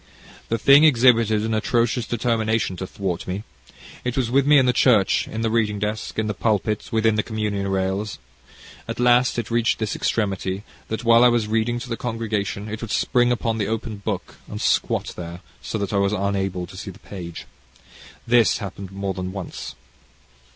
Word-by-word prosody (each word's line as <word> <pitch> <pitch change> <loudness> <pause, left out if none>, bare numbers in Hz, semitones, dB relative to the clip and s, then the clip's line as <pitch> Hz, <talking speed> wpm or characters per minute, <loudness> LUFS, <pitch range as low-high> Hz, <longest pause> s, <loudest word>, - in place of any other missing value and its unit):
The 115 - +1
thing 140 +5 +6
exhibited 115 -6 +4
an 110 0 -1
atrocious 115 +2 +1
determination 115 -4 0
to 95 - -5
thwart 90 -3 -4
me. 95 +3 -3 0.6
It 125 0 -3
was 120 -3 0
with 135 +1 +3
me 150 0 +7
in 130 - +5
the 125 - +3
church 115 -6 +3
in 110 - -5
the 115 - +1
reading 110 -2 +1
desk 105 +2 -3
in 110 - 0
the 105 - -1
pulpit 105 +1 -1
within 110 -1 +2
the - - +3
communion 105 -3 -2
rails. 95 +2 -1 0.7
At - - -5
last, 125 +1 +4
it 120 -1 -3
reached 115 0 +2
this 110 -2 -2
extremity, 95 -2 -1 0.2
that 110 +2 -4
while 115 0 +6
I - - +8
was 120 -3 +2
reading 115 +2 0
to 135 - -7
the 115 - -2
congregation, 110 -3 -3
it 110 +1 -6
would 115 - -5
spring 120 +3 +2
upon 115 -2 -1
the 105 - 0 0.4
book 100 -4 -4
and - - -6
squat - - 0
there, 85 0 -7 0.2
so - - -4
that 100 -1 -3
I - - +2
was 100 +1 +2
unable 95 -3 -1
to 95 - -13
see 95 +2 -7
the 95 - -11
page. 90 -6 -8 0.8
This 120 -2 +4
happened 100 -1 -7
more 100 0 -3
than 95 0 -4
once. 95 -9 -7
110 Hz, 185 wpm, -23 LUFS, 100-115 Hz, 0.8 s, I